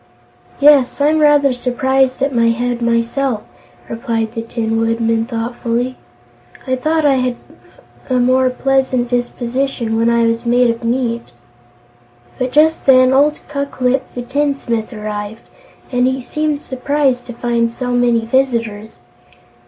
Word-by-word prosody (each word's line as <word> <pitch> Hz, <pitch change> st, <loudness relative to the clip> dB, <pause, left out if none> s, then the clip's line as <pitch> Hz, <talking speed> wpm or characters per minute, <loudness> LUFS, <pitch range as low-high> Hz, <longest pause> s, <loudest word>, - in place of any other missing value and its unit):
"Yes; 285 Hz, -2 st, +4 dB
I'm 300 Hz, +2 st, +3 dB
rather 290 Hz, -3 st, +4 dB
surprised 260 Hz, +1 st, 0 dB
at 275 Hz, 0 st, 0 dB
my 230 Hz, -1 st, +3 dB
head, 240 Hz, +1 st, -1 dB
myself," 235 Hz, 0 st, 0 dB, 0.4 s
replied 230 Hz, -2 st, -3 dB
the 230 Hz, -, -3 dB
Tin 225 Hz, -1 st, -2 dB
Woodman, 225 Hz, 0 st, 0 dB
thoughtfully. 240 Hz, +1 st, -3 dB, 0.7 s
"I 260 Hz, -, 0 dB
thought 310 Hz, +4 st, 0 dB
I 275 Hz, -2 st, +4 dB
had 255 Hz, -1 st, -1 dB, 0.7 s
a 255 Hz, -, +1 dB
more 255 Hz, +1 st, +3 dB
pleasant 260 Hz, -1 st, 0 dB
disposition 245 Hz, -1 st, -2 dB
when 230 Hz, +1 st, +2 dB
I 235 Hz, 0 st, +2 dB
was 230 Hz, 0 st, 0 dB
made 240 Hz, 0 st, +3 dB
of 230 Hz, +1 st, -7 dB
meat." 235 Hz, -1 st, -1 dB, 1.1 s
But 255 Hz, 0 st, -1 dB
just 310 Hz, +3 st, +2 dB
then 255 Hz, -1 st, +6 dB
old 295 Hz, +3 st, +2 dB
Ku 280 Hz, -1 st, -3 dB
Klip 260 Hz, 0 st, -1 dB
the 245 Hz, -, -4 dB
Tinsmith 260 Hz, -4 st, -2 dB
arrived, 210 Hz, 0 st, -6 dB, 0.5 s
and 250 Hz, 0 st, +2 dB
he 260 Hz, 0 st, -1 dB
seemed 300 Hz, +3 st, -2 dB
surprised 260 Hz, -1 st, -1 dB
to 240 Hz, -, -7 dB
find 235 Hz, -1 st, 0 dB
so 250 Hz, +1 st, -4 dB
many 240 Hz, -2 st, +2 dB
visitors. 230 Hz, -, -1 dB
245 Hz, 135 wpm, -16 LUFS, 230-270 Hz, 1.1 s, then